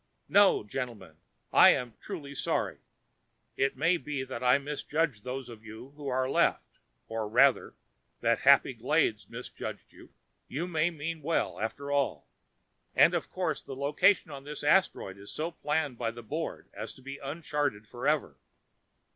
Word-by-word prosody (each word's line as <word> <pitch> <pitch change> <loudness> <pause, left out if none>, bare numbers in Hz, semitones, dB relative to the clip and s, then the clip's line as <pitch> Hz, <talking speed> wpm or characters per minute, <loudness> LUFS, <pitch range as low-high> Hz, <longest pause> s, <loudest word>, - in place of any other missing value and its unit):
No 200 - +5
gentlemen, 110 - -6 0.4
I - - +8
am 125 -2 -4
truly 150 -9 -7
sorry. 140 - -1 0.8
It 135 -1 0
may 165 +6 +3
be 145 -5 -4
that 130 -2 -6
I 125 +2 +6
misjudged 145 -3 -2
those 130 +1 -5
of 115 -2 -11
you 110 +4 -10
who 145 -1 -8
are 130 0 +1
left, - - +1 0.3
or 110 -2 -3
rather, 130 +4 +4 0.4
that - - +2
Happy - - +5
Glades - - 0
misjudged - - -7
you. - - -16 0.4
You 150 +7 -3
may 165 -2 +1
mean 165 0 -5
well, 165 +3 -1
after 140 +6 -4
all 140 -1 0 0.7
and, - - +6
of - - -2
course, - - -2
the 135 - -8
location 150 +6 +3
of 135 -1 -8
this 150 +1 -7
asteroid 145 - +2
was 100 +1 -9
so 160 +3 -3
planned 150 -5 -2
by 115 -2 0
the 120 +1 -9
Board 155 +8 -4
as - - -6
to 130 - -16
be 135 +1 -7
uncharted 145 -7 -2
forever. 125 - -1
140 Hz, 155 wpm, -30 LUFS, 120-150 Hz, 0.8 s, I